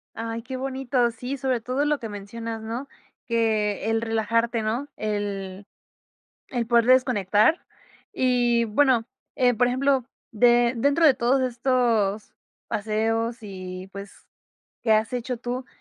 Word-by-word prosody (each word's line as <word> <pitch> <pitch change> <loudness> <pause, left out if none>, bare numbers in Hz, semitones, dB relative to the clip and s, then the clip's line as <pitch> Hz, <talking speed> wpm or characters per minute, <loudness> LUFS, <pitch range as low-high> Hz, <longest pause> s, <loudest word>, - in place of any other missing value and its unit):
Ay, 230 0 -4
qué 260 +2 -6
bonito. 260 -2 0
Sí, 250 +4 -5
sobre 260 -3 -1
todo 255 +5 -1
lo 295 -1 +1
que 225 - -6
mencionas, 225 +3 -6
¿no?, 230 +5 -5 0.4
que 220 -3 0
el 225 0 +1
relajarte, 230 +1 0
¿no?, 230 +6 -2
el 205 -2 -4 0.8
el 240 -3 -2
poder 235 0 +4
desconectar. 245 - +3 0.5
Y 245 -2 +2
bueno, 235 +1 +2 0.3
eh, 250 -1 +3
por 245 +3 +3
ejemplo, 265 0 +1 0.3
de 240 +1 +4
dentro 285 +7 +3
de 280 - +6
todos 250 +3 +2
estos 235 -5 0 0.3
paseos 225 +2 -1
y, 185 -2 -8
pues, 200 0 -8 0.7
que 225 - +3
has 220 +3 +2
hecho 250 0 -3
tú, 245 +2 -5
235 Hz, 135 wpm, -24 LUFS, 220-255 Hz, 0.8 s, de